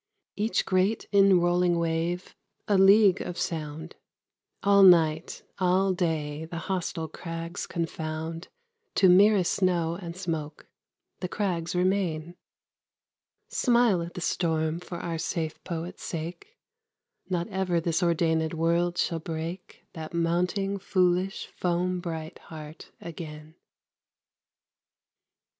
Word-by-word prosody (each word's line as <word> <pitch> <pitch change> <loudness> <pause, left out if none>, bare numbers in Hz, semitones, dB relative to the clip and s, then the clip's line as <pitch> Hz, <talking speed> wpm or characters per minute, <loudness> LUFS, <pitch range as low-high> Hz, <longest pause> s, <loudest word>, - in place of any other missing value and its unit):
Each 215 +3 0
great 190 +4 +1
inrolling 180 -3 +4
wave, 170 +2 -2 0.3
a 205 - +3
league 195 0 +6
of 180 - -5
sound, 160 -2 -4 0.7
All 200 0 +5
night, 165 -4 +5 0.2
all 185 +1 +3
day, 160 -4 -2
the 165 +1 -7
hostile 170 -2 -3
crags 165 +2 -6
confound 165 0 -4 0.5
To 190 - +5
merest 195 0 +5
snow 175 -3 +1
and 170 -1 -7
smoke. 160 -5 -4 0.5
The 180 - -3
crags 180 -4 -2
remain. 180 -3 0 1.1
Smile 235 -7 +3
at 170 +1 -7
the 180 - -5
storm 160 -2 0
for 180 0 -7
our 165 -2 -4
safe 160 -1 -3
poet's 170 0 -5
sake! 175 - -6 0.7
Not 175 -1 -1
ever 190 -3 0
this 165 -1 0
ordainèd 160 -2 +1
world 170 +2 +1
shall 165 -2 0
break 165 +3 -6
That 160 0 -7
mounting, 180 +4 0
foolish, 185 0 +1
foam 180 +1 -1
bright 160 -2 -6
heart 155 -1 -11
again. 155 -2 -8
175 Hz, 110 wpm, -27 LUFS, 165-185 Hz, 1.1 s, league